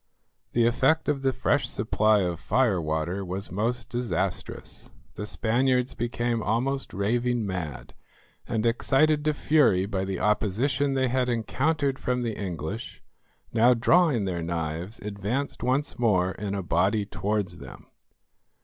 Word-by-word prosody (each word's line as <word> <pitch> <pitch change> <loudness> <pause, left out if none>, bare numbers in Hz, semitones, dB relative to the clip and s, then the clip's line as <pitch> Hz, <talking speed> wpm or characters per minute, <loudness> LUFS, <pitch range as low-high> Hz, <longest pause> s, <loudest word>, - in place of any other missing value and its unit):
The 120 -1 +3
effect 135 +7 +2
of 145 -2 0
the 135 -1 +2
fresh 130 0 +1
supply 110 -1 +2
of 90 -3 -2
fire 100 +2 +2
water 80 +5 -2
was 95 +1 -5
most 115 +5 -1
disastrous. 120 -7 -3 0.2
The 105 - -5
Spaniards 125 +3 +1
became 120 0 -1
almost 125 +6 -1
raving 120 +4 0
mad, 90 -7 -5 0.5
and, 110 0 -1
excited 145 +6 +3
to 155 - +3
fury 135 -13 +3
by 95 -2 -2
the 95 -1 -3
opposition 130 +7 +1
they 130 -1 +1
had 125 0 +1
encountered 135 +4 0
from 125 -1 -1
the 115 -3 -2
English, 95 +2 -5 0.5
now 120 +2 +5
drawing 135 - +3
their 90 -3 -2
knives, 85 +4 -3
advanced 105 +7 -3
once 130 +3 0
more 95 -6 +2
in 100 0 -4
a 100 - -3
body 95 +5 +1
towards 100 -4 -2
them. 70 - -11
110 Hz, 140 wpm, -26 LUFS, 95-130 Hz, 0.5 s, now